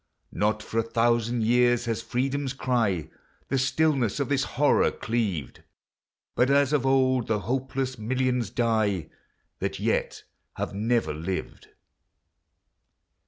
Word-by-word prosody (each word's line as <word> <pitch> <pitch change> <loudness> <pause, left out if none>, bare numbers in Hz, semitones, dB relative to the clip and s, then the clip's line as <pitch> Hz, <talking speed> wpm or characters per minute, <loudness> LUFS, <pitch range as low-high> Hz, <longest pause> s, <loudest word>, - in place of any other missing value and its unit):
Not 105 +1 0
for 115 - -2
a - - +4
thousand 115 0 +1
years 120 +1 +3
has 115 -1 -2
Freedom's 135 +4 -2
cry 115 - 0 0.4
The 135 - +1
stillness 135 -3 +1
of 140 - -1
this 135 -2 +2
horror 145 +1 +4
cleaved, 105 - -3 0.7
But 125 - +2
as 140 +1 +3
of 135 -3 +2
old 130 -2 +2
the 105 -2 0
hopeless 130 +1 -2
millions 125 0 0
die, 110 -8 0 0.5
That - - -3
yet - - -1 0.3
have - - -4
never 115 -2 0
lived. 85 +5 -5
120 Hz, 120 wpm, -26 LUFS, 110-130 Hz, 0.7 s, a